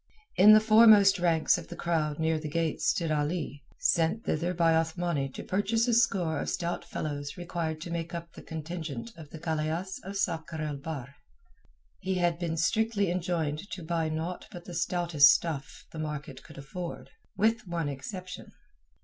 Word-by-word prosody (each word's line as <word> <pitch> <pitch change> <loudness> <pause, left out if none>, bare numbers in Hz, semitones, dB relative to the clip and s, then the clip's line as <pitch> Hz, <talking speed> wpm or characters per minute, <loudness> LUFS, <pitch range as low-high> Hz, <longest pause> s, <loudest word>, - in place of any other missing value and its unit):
In 210 +3 +8
the 215 - +9
foremost 215 -3 +7
ranks 170 -1 +3
of 170 - -10
the - - -8
crowd 155 -3 -1
near 160 0 +1
the 155 -1 -5
gate 165 0 -1
stood 165 -2 +1
Ali, 150 -1 -2
sent 165 +7 +1
thither 170 +3 0
by 165 -2 +3
Othmani 160 -3 0
to - - -6
purchase 220 +5 +1
a 240 - +2
score 180 -9 +2
of - - -3
stout 175 -1 -2
fellows 145 0 -5
required 170 -3 -3
to 170 - -6
make 170 -1 -3
up 170 0 -7
the - - -11
contingent 160 -7 -6
of 160 -3 -11
the 160 - -9
galeasse 160 +3 -2
of 195 +1 -5
Sakr 165 -4 -2
el 150 -2 -3
Bahr. 140 -2 -7 0.8
He 190 0 -2
had 175 -2 +1
been 165 -2 -2
strictly 200 +3 +1
enjoined 170 -1 -2
to 185 - -6
buy 165 -1 -1
naught 160 +3 -4
but 175 0 -10
the 175 - -8
stoutest 170 -4 +4
stuff 155 -4 -1
the 160 - -7
market 150 -3 -5
could - - -15
afford—with 180 - -3
one 170 -3 -2
exception. 180 +7 -7
165 Hz, 170 wpm, -29 LUFS, 155-180 Hz, 0.8 s, the